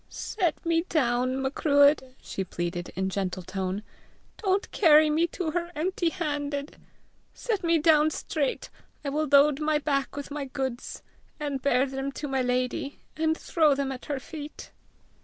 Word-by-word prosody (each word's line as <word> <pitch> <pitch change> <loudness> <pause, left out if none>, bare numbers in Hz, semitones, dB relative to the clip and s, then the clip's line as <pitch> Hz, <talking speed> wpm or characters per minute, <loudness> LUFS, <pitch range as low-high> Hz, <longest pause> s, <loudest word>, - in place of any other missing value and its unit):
"Set 355 -8 -2
me 330 0 +3
down, 255 -3 +1
Macruadh!" 285 +1 +4 0.2
she 190 - -4
pleaded 175 -1 -4
in 190 0 0
gentle 185 -1 -2
tone. 190 +2 -3 0.6
"Don't 390 +1 +1
carry 310 -4 +6
me 325 +3 +2
to 340 -1 -3
her 345 +1 -2
empty 345 +2 0
handed! 290 -4 -3 0.6
Set 430 -6 -2
me 335 0 +3
down 310 -1 +5
straight; 300 -2 -2 0.3
I - - 0
will 305 +2 0
load 285 0 +5
my 305 0 +2
back 280 -2 -1
with 285 0 -6
my 290 -1 -3
goods, 260 -1 -4 0.4
and 285 -3 -3
bear 260 -1 +3
them 270 0 -4
to 295 - -5
my 270 -1 0
lady, 250 +2 -1 0.2
and 320 0 +1
throw 310 -4 +3
them 275 -1 -1
at 255 -2 -7
her 290 -2 -2
feet." 300 +2 -9
285 Hz, 160 wpm, -27 LUFS, 265-315 Hz, 0.6 s, carry